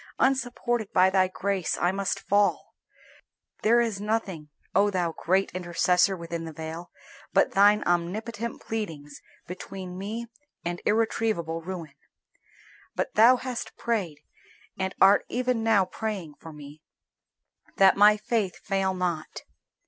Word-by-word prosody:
Unsupported 240 -4 0
by 185 +1 +4
Thy 190 -1 +3
grace 190 -1 -2
I 175 - +1
must 195 0 -2
fall. 205 0 +1 0.9
There 235 +2 +4
is 225 -4 -1
nothing, 200 -8 -3 0.2
O 205 - +4
Thou 180 -4 -1
great 190 +3 +1
Intercessor 180 +1 +1
within 170 0 -5
the 165 - -6
veil, 160 +2 -7 0.4
but - - +3
Thine 205 +2 +5
omnipotent 210 +7 -2
pleadings 160 -10 -6 0.2
between 185 0 -8
me 220 +4 -4 0.4
and 175 0 -3
irretrievable 215 -6 0
ruin. 165 -4 -7 1.0
But - - -2
Thou 230 +4 +7
hast 250 -1 -6
prayed, 190 -11 -2 0.5
and 190 0 -3
art 195 +1 +6
even 250 -1 0
now 215 -4 +4
praying, 195 -6 -5
for 160 - -10
me 150 0 -12 1.0
that 195 -1 +6
my 210 +1 +6
faith 210 -3 -1
fail 195 -1 -1
not. 175 -4 -3
195 Hz, 125 wpm, -26 LUFS, 175-220 Hz, 1.0 s, Thou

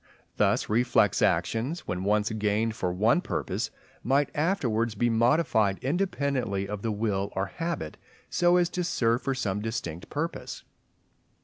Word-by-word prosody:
Thus - - +2
reflex 120 +3 +2
actions, 130 +10 +1
when 90 +1 -4
once 105 +1 +1
gained 110 +1 0
for 90 -4 -1
one 110 - +3
purpose, 80 - -2 0.3
might 140 +3 +2
afterwards 125 - 0
be 120 +3 +1
modified 115 -4 +3
independently 135 - -1
of 105 0 -5
the 115 - -1
will 100 -2 -1
or 95 - 0
habit, 165 - -4 0.3
so 175 0 +3
as 175 -1 +3
to 180 - -1
serve 120 -8 +1
for 135 -1 -1
some 105 -6 -1
distinct 105 -7 -4
purpose. 165 +3 -4
115 Hz, 140 wpm, -27 LUFS, 100-140 Hz, 0.3 s, one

